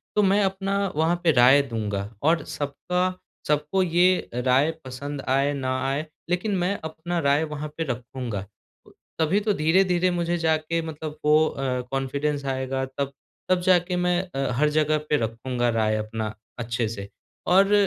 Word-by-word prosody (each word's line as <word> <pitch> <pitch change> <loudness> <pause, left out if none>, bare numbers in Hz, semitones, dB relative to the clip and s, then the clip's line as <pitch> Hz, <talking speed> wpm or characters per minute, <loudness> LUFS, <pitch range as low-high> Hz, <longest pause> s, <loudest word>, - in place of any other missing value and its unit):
तो 210 - +4
मैं 195 +2 +4
अपना 195 +1 -1 0.2
वहाँ 160 +2 +2
पे 165 - +5
राय 130 +2 +6
दूँगा। 105 -5 -3
और 160 0 +3
सबका 180 +6 -2 0.3
सबको 150 +5 +1
ये 180 +2 +3
राय 130 +5 +3
पसंद 140 +2 -5
आए, 135 +2 +2
ना 130 -2 -1
आए, 140 +3 -1 0.2
लेकिन 190 +3 0
मैं 180 +3 0
अपना 170 +2 -3
राय 140 +1 +3
वहाँ 150 -1 -4
पे 165 - 0
रखूँगा। 120 -5 -4 0.7
तभी 160 +6 +3
तो 210 0 +1
धीरे-धीरे 180 +2 +3
मुझे 175 0 0
जाके 160 0 0
मतलब 155 -1 -6
वो 150 0 +6
अ, 130 -2 -2
कॉन्फिडेंस 140 +2 -1
आएगा 130 0 -1
तब 140 0 -2 0.4
तब 185 -1 +3
जाके 180 0 +3
मैं 180 0 +2
अ, 135 -1 0
हर 150 +1 +3
जगह 155 0 +2
पे 150 - +3
रखूँगा 120 +1 -1
राय 110 -1 +1
अपना 110 0 -3 0.3
अच्छे 115 -1 -1
से। 100 -2 -7 0.4
और 195 +3 +5
150 Hz, 160 wpm, -25 LUFS, 130-175 Hz, 0.7 s, राय